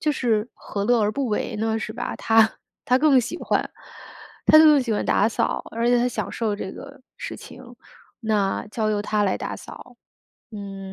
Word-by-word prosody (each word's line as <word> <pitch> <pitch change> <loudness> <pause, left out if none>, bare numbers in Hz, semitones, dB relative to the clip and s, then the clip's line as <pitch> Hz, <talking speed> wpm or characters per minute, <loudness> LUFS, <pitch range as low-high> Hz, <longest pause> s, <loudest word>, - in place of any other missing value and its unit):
就 305 -1 +1
是 230 -4 0
何 200 -1 -5
乐 240 0 +3
而 210 0 +2
不 275 +4 -2
为 215 +1 -2
呢， 220 +1 -1
是 215 - -5
吧？ 245 +1 -4
他 225 -1 +3 0.3
他 255 +1 +3
更 285 -3 +5
喜 255 +9 -5
欢 - - -1 0.8
他 310 - +8
更 305 -3 +7
喜 235 -3 -2
欢 205 - -1
打 205 - +3
扫， - - -1
而 230 +1 -1
且 245 0 +4
他 245 - +2
享 - - -4
受 220 -3 -2
这 190 -2 -5
个 280 0 -11 0.2
事 - - -6
情， - - -12 0.6
那 210 -3 0
交 215 0 -1
由 210 - 0
他 210 0 0
来 195 - +1
打 - - -5
扫， - - -12 0.6
嗯， 195 -2 -7
225 Hz, 210 characters per minute, -23 LUFS, 210-250 Hz, 0.8 s, 他